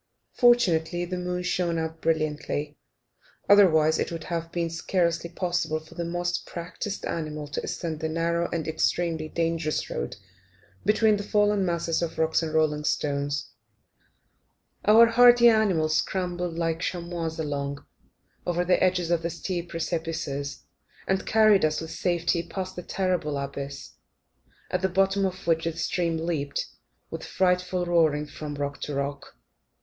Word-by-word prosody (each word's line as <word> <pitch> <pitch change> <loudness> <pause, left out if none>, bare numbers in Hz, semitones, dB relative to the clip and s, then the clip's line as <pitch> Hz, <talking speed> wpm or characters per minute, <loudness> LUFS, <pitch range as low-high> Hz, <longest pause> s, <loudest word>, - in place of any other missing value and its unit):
Fortunately 175 -8 +3
the 180 +1 -4
moon 180 0 -3
shone 175 -2 0
out 160 0 -4
brilliantly, 150 -2 -1 0.7
otherwise 160 -6 +5
it - - -1
would 165 -1 -5
have 165 -1 -4
been 170 -1 -1
scarcely 170 0 0
possible 175 -3 -1
for 160 +1 -16
the 170 0 -4
most 175 +1 -2
practised 180 +4 -5
animal 155 -2 -4
to 145 - -3
ascend 160 -3 -4
the 160 - -2
narrow 170 +1 0
and 165 -2 -3
extremely 160 0 0
dangerous 165 -2 -1
road - - -3 0.7
between 215 +1 +4
the - - -3
fallen 205 -1 +2
masses 170 -2 0
of 170 -2 -3
rock 160 0 0
and 160 -1 -3
rolling 150 -1 +2
stones. 145 -1 -1 1.3
Our 220 +3 +8
hardy 240 +1 +7
animals 180 -9 +2
scrambled 180 -2 -2
like 165 -1 0
chamois 170 -2 -3
along, 140 -2 -3 0.6
over 175 0 0
the 180 - +3
edges 180 -2 +1
of 170 -1 +2
the 170 - -2
steep 175 0 -4
precipices, 160 -4 -3 0.4
and 190 0 0
carried 215 -2 +5
us 155 0 +2
with 160 0 -6
safety 175 0 0
past 185 +2 -6
the 180 - -5
terrible 180 -6 -1
abyss, 140 0 -6 0.8
at 180 - 0
the 190 - +1
bottom 195 +2 +2
of 185 0 -8
which 165 -1 +1
the 165 - -1
stream 165 0 0
leapt, 160 -4 -2 0.5
with - - -5
a - - -8
frightful 180 -1 +1
roaring, 160 -4 +2
from 150 0 -7
rock 140 0 -4
to 145 - -4
rock. 140 0 -4
170 Hz, 150 wpm, -26 LUFS, 155-180 Hz, 1.3 s, Our